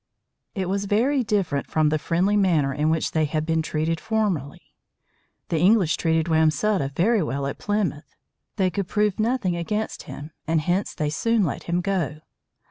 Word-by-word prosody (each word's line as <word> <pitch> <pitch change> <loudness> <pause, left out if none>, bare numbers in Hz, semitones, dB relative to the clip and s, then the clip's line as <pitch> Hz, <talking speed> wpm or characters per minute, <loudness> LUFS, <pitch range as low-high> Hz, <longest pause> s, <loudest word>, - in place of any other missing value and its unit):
It 190 -3 -2
was 200 +2 -1
very 245 +8 +2
different 190 -10 -1
from 155 -1 +2
the 155 0 0
friendly 180 +6 +1
manner 165 -9 +2
in 150 +2 0
which 160 0 0
they 155 -1 +1
had 155 +1 -2
been 160 0 +1
treated 160 +1 -1
formerly. 200 -11 -2 0.8
The 165 - 0
English 185 -1 +4
treated 160 -1 +1
Wamsutta 160 +1 +2
very 210 +6 +3
well 140 -3 -2
at 140 - -4
Plymouth. 195 -8 -2 0.4
They 190 -3 +1
could 195 +1 -2
prove 210 -1 0
nothing 215 -5 +1
against 210 +6 -3
him, 150 +3 -8 0.2
and 160 0 +2
hence 180 +6 -1
they 150 -1 -1
soon 230 +7 +1
let 155 - -3
him 175 +1 0
go. 170 -6 -2
170 Hz, 170 wpm, -24 LUFS, 155-205 Hz, 0.8 s, English